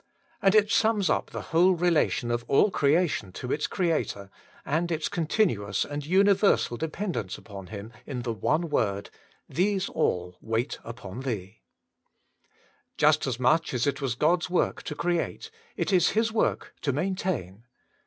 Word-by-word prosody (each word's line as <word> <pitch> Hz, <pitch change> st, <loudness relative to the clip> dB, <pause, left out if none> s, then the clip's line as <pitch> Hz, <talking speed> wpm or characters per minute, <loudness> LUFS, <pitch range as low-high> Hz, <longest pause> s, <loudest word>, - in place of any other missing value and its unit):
And 195 Hz, +1 st, +4 dB
it 210 Hz, 0 st, +4 dB
sums 215 Hz, -5 st, +3 dB
up -, -, 0 dB
the -, -, -5 dB
whole 180 Hz, +3 st, +5 dB
relation 165 Hz, -7 st, +1 dB
of 120 Hz, 0 st, -1 dB
all 195 Hz, +9 st, +4 dB
creation 145 Hz, -, +1 dB
to 125 Hz, +5 st, -5 dB
its 150 Hz, -, 0 dB
Creator, 155 Hz, -, -1 dB, 0.3 s
and 165 Hz, +4 st, 0 dB
its 160 Hz, -1 st, -1 dB
continuous 155 Hz, -, 0 dB
and 145 Hz, 0 st, -5 dB
universal 195 Hz, -, +3 dB
dependence 155 Hz, -, -3 dB
upon 100 Hz, -3 st, -10 dB
Him 110 Hz, +2 st, -8 dB
in 125 Hz, -4 st, -4 dB
the 115 Hz, -2 st, -2 dB
one 155 Hz, -, 0 dB
word: 100 Hz, -8 st, -1 dB, 0.4 s
^IJiese 190 Hz, +5 st, 0 dB
all 90 Hz, 0 st, -1 dB
wait 115 Hz, +4 st, -2 dB
upon 115 Hz, -2 st, -8 dB
Thee 110 Hz, -6 st, -5 dB, 0.6 s
/' -, -, -38 dB
Just -, -, +3 dB
as 125 Hz, -2 st, -2 dB
much 135 Hz, +3 st, +2 dB
as 120 Hz, -, +1 dB
it 140 Hz, 0 st, -1 dB
was 130 Hz, -4 st, -1 dB
God's 170 Hz, +7 st, +2 dB
work 180 Hz, -, 0 dB
to 150 Hz, -, -4 dB
create, 175 Hz, -, -2 dB, 0.3 s
it -, -, -1 dB
is 180 Hz, -2 st, +5 dB
His 225 Hz, 0 st, +2 dB
work 220 Hz, -, 0 dB
to 140 Hz, -, 0 dB
maintain. 145 Hz, -, -2 dB
150 Hz, 155 wpm, -27 LUFS, 115-180 Hz, 0.6 s, whole